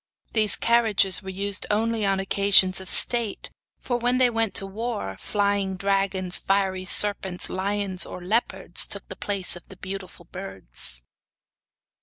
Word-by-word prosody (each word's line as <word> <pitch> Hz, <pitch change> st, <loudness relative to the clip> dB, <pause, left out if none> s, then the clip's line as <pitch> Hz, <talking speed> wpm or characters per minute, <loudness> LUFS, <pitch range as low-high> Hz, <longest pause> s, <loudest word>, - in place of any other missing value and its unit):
These 215 Hz, -2 st, +3 dB
carriages 220 Hz, -5 st, +3 dB
were 190 Hz, -, -9 dB
only 190 Hz, +1 st, -7 dB
used 200 Hz, 0 st, -1 dB
on 220 Hz, +2 st, 0 dB, 0.3 s
occasions 195 Hz, -1 st, +3 dB
of 190 Hz, -, -6 dB
state, 235 Hz, -4 st, +2 dB, 0.3 s
for 245 Hz, -, -3 dB
when 245 Hz, +1 st, 0 dB
they 250 Hz, -1 st, +3 dB
went 225 Hz, -2 st, -1 dB
to 195 Hz, -, +2 dB
war 210 Hz, -, -5 dB
flying 200 Hz, -2 st, -1 dB
dragons, 195 Hz, -1 st, 0 dB
fiery 190 Hz, -1 st, -1 dB
serpents, 190 Hz, -2 st, +1 dB
lions 195 Hz, 0 st, -1 dB
or -, -, -7 dB
leopards, 210 Hz, +7 st, +1 dB
took -, -, -5 dB
the -, -, -8 dB
place 200 Hz, -3 st, 0 dB
of 175 Hz, -, -10 dB
the 190 Hz, -, -13 dB
beautiful 190 Hz, -2 st, -8 dB
birds. 65 Hz, -, -1 dB
195 Hz, 145 wpm, -24 LUFS, 185-210 Hz, 0.3 s, These